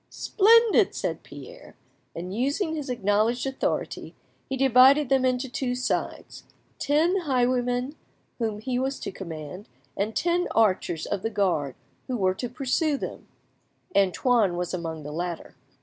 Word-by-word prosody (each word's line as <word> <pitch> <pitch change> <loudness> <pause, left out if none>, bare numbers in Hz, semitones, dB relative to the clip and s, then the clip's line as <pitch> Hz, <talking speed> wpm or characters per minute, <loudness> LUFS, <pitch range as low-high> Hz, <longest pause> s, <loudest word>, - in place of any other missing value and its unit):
"Splendid!" 455 +2 +4
said - - -3
Pierre; - - -12 0.4
and 180 +3 -5
using 285 - 0
his 300 -3 -4
acknowledged 220 +2 +1
authority, 270 0 -3 0.3
he 265 - -2
divided 265 +2 +5
them 265 -1 +3
into 255 +1 0
two 250 0 -2
sides—ten 300 +6 -2
highwaymen, 250 -4 0 0.5
whom 220 -3 -1
he 250 +1 -1
was 270 +1 -2
to - - -5
command, 170 0 -8 0.3
and 215 +2 -2
ten 350 +1 +1
archers 185 -6 +1
of 190 - -3
the 225 - -1
guard, 175 - 0 0.3
who 255 -2 -2
were 185 -3 +2
to 245 +6 -5
pursue 275 +4 0
them; - - -7 0.7
Antoine 200 0 +2
was 180 0 -3
among 165 -3 -4
the 150 - -7
latter. 170 +2 -5
245 Hz, 135 wpm, -26 LUFS, 190-270 Hz, 0.7 s, divided